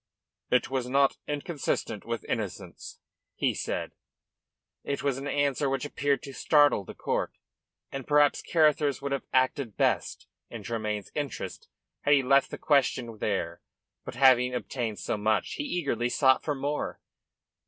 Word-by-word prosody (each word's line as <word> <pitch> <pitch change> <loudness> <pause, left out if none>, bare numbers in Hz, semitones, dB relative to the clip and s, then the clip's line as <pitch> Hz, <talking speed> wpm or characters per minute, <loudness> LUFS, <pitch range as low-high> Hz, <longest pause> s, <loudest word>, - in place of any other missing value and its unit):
"It 125 +1 +2
was 130 -2 -1
not 135 +1 +3
inconsistent 145 - -3
with 115 -2 -3
innocence," - - -5 0.4
he - - +1
said. - - -3 0.9
It 140 - -3
was 135 -2 0
an 140 - -5
answer 140 -1 +1
which 135 +1 -1
appeared 145 -1 0
to 140 - -8
startle 145 -7 +4
the - - -10
court, - - -2 0.6
and 135 -2 -6
perhaps 145 -1 +4
Carruthers 150 -3 +2
would 140 - -2
have 140 - -2
acted 130 -3 +1
best - - 0 0.2
in 115 -3 -8
Tremayne's 105 -2 -3
interest 145 -2 -5 0.3
had 145 - +4
he 135 - +2
left 135 +1 +4
the - - -6
question 125 -6 +1
there. - - -2 0.4
But - - -7
having 125 -1 +5
obtained 120 -3 -3
so 90 - -2
much 110 +1 0
he - - -2
eagerly 140 - -1
sought 130 0 +4
for 150 - -1
more. 145 +2 -3
135 Hz, 150 wpm, -28 LUFS, 120-145 Hz, 0.9 s, having